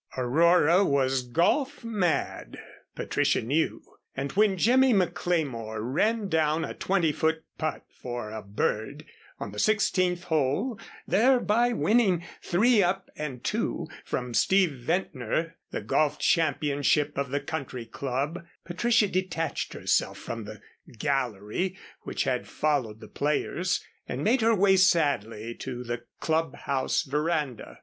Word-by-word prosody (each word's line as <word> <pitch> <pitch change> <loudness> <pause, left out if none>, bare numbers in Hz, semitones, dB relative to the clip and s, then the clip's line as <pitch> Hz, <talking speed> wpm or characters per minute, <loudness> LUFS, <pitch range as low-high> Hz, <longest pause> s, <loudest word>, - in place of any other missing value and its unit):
Aurora 170 +7 +4
was 135 -5 +2
golf 205 - 0
mad, 200 -8 -1 0.4
Patricia - - +1
knew, 145 +8 0 0.3
and 135 +1 -2
when 205 -1 +3
Jimmy 255 +5 +4
McLemore 155 - -1
ran 200 - 0
down 160 -1 +1
a - - -6
twenty 175 -5 +1
foot 160 +1 0 0.2
putt 155 -1 -3 0.2
for 120 -3 -5
a 110 0 -5
"bird" 110 +7 -2 0.3
on 100 - -5
the 105 - -6
sixteenth 185 - +2
hole, 160 - 0 0.3
thereby 240 0 +3
winning 205 -7 +2 0.2
"three 215 +5 +3
up 190 +1 -1
and 135 -5 -6
two" - - -2 0.2
from 125 -1 -4
Steve 190 +5 +3
Ventnor, 155 - -2
the - - -4
golf 145 +8 +1
championship 145 -2 +1
of 140 -1 -2
the 140 +2 0
Country 135 -6 -5
Club, 140 +8 -3 0.2
Patricia 225 +5 +2
detached 185 -4 -2
herself - - 0
from 115 -2 -6
the 110 0 -10 0.4
"gallery" 135 - -1 0.2
which - - -2
had - - -1
followed 130 -8 -1
the 110 - -10
players 150 - -1 0.2
and - - -3
made 240 +4 +3
her 225 0 +4
way 195 -1 +4
sadly 130 - +2
to 125 0 -6
the 120 0 -5
Club 160 -3 0
House 140 +2 -1
veranda. 150 -3 -2
155 Hz, 130 wpm, -27 LUFS, 130-185 Hz, 0.4 s, Aurora